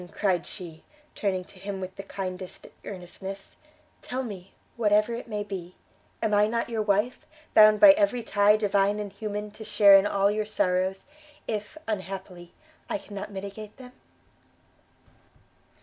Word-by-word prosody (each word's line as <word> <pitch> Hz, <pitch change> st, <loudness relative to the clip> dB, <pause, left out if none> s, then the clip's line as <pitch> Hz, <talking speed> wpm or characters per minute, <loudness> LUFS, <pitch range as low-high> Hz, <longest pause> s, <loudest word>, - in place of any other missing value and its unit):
cried 185 Hz, -5 st, 0 dB
she, 165 Hz, -5 st, -8 dB, 0.3 s
turning 190 Hz, -3 st, -1 dB
to 185 Hz, -, -16 dB
him 195 Hz, 0 st, -5 dB
with 185 Hz, 0 st, -6 dB
the 195 Hz, -, -6 dB
kindest 185 Hz, -2 st, -6 dB, 0.2 s
earnestness; 195 Hz, +1 st, -8 dB, 0.5 s
"tell 260 Hz, +1 st, -4 dB
me, 195 Hz, -6 st, -8 dB, 0.2 s
whatever 210 Hz, 0 st, +2 dB
it 240 Hz, +2 st, -6 dB
may 210 Hz, -2 st, -3 dB
be! 185 Hz, -3 st, -7 dB, 0.5 s
Am 215 Hz, -, +1 dB
I 205 Hz, 0 st, +5 dB
not 230 Hz, +1 st, -2 dB
your 225 Hz, -1 st, 0 dB
wife? 210 Hz, +4 st, +1 dB, 0.3 s
bound 215 Hz, -1 st, +7 dB
by 305 Hz, -, +10 dB
every 295 Hz, -5 st, +1 dB
tie 205 Hz, 0 st, +4 dB
divine 205 Hz, -1 st, +2 dB
and 205 Hz, -2 st, -5 dB
human 210 Hz, 0 st, -5 dB
to 215 Hz, +1 st, -10 dB
share 205 Hz, -2 st, +7 dB
in 195 Hz, +1 st, +3 dB
all 200 Hz, 0 st, +2 dB
your 215 Hz, 0 st, -2 dB
sorrows, 185 Hz, -2 st, 0 dB, 0.4 s
if, 215 Hz, +7 st, -4 dB
unhappily, 190 Hz, -4 st, -5 dB, 0.4 s
I 310 Hz, -, 0 dB
cannot 205 Hz, -8 st, -8 dB
mitigate 200 Hz, +2 st, -8 dB
them!" 250 Hz, -1 st, -12 dB
205 Hz, 150 wpm, -27 LUFS, 190-215 Hz, 0.5 s, by